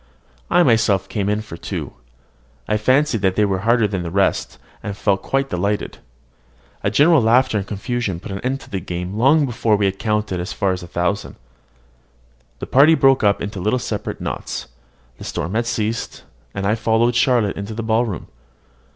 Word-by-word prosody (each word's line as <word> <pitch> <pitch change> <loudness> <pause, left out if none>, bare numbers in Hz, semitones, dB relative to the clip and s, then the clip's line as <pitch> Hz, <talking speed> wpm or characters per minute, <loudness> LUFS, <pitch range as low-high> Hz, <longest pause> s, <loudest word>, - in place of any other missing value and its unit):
I 175 - +5
myself 105 - +2
came 100 -1 -2
in 105 +1 0
for 85 -6 -9
two. - - -5 0.7
I 105 - +1
fancied 130 +2 +2
they 95 +2 +2
were 95 -2 -1
harder 115 +1 +3
than 95 -3 -3
the 85 - -4
rest, 95 +2 0 0.2
and 100 -1 -5
felt 100 -2 +1
quite 135 0 -1
delighted. 100 +3 -2 0.8
A - - +2
general 160 0 +5
laughter 115 0 +3
and 100 - -6
confusion 105 -3 -3
put 100 - -9
an 95 - -4
end 130 +4 -2
to - - -14
the 95 - -2
game 90 +1 -5
long 140 +7 +4
before 115 -3 +1
we 100 -1 +1
had 95 0 -1
counted 105 -4 -1
as 90 +3 -4
far 100 -3 0
as 90 0 -3
a 85 - -9
thousand. 90 +3 -2 1.2
The - - -6
party 145 +5 +5
broke 135 -4 +4
up 100 -1 +2
into 100 -1 -5
little 105 +7 +1
separate 120 - -4
knots: - - -5 0.5
the - - -8
storm 90 - -4
had 115 +1 0
ceased, 115 0 -3 0.3
and 100 - -3
I 105 - +2
followed 115 +2 +2
Charlotte 120 -4 +2
into 100 +2 -6
the 115 - -4
ballroom. 110 -3 0
105 Hz, 185 wpm, -20 LUFS, 95-120 Hz, 1.2 s, I